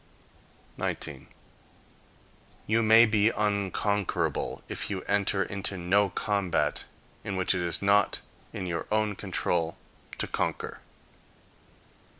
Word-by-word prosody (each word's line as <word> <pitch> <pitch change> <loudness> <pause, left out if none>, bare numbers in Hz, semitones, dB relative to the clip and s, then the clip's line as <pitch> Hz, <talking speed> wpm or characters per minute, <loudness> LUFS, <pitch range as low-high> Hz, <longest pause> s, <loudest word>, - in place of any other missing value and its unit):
19. - - -2 1.4
You 115 +2 +2
may 110 +1 +7
be 110 -1 +3
unconquerable, 100 -1 -1
if - - -4
you 95 -2 -3
enter 100 -1 +1
into 100 0 -3
no 100 +3 +2
combat 100 -2 0 0.4
in 100 - -3
which 95 0 +2
it 90 - -1
is 85 +2 -1
not 100 0 +3 0.3
in - - -5
your 85 -2 -3
own 105 -1 +2
control 85 -4 -1 0.4
to - - -1
conquer. - - -3
100 Hz, 110 wpm, -28 LUFS, 95-105 Hz, 1.4 s, may